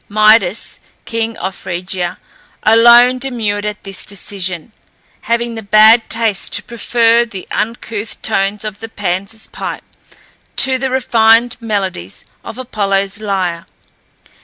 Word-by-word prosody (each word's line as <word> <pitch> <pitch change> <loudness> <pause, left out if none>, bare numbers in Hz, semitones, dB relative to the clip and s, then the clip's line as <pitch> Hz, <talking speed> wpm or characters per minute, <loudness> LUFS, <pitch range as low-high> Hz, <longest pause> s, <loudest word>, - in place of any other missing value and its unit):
Midas, 215 - +3 0.3
king 225 -1 -3
of 190 +1 -4
Phrygia, 180 -1 -5 0.5
alone 240 +3 +6
demurred 220 -6 -2
at 210 0 -6
this 195 -2 -5
decision, 190 -2 -5 0.5
having 235 0 -1
the 225 - -6
bad 220 +2 +5
taste 225 -4 0
to - - -3
prefer 235 0 +2
the 200 -6 -9
uncouth 225 -1 -4
tones 195 +2 0
of 210 -1 -6
the 225 - -8
Pan's 200 +2 -4
pipe - - -6 0.7
to 265 -1 +4
the 265 +1 -1
refined 235 -2 +3
melodies 190 - -4 0.2
of 225 - -8
Apollo's 200 -5 -2
lyre. 185 -5 -2
215 Hz, 120 wpm, -15 LUFS, 195-230 Hz, 0.7 s, alone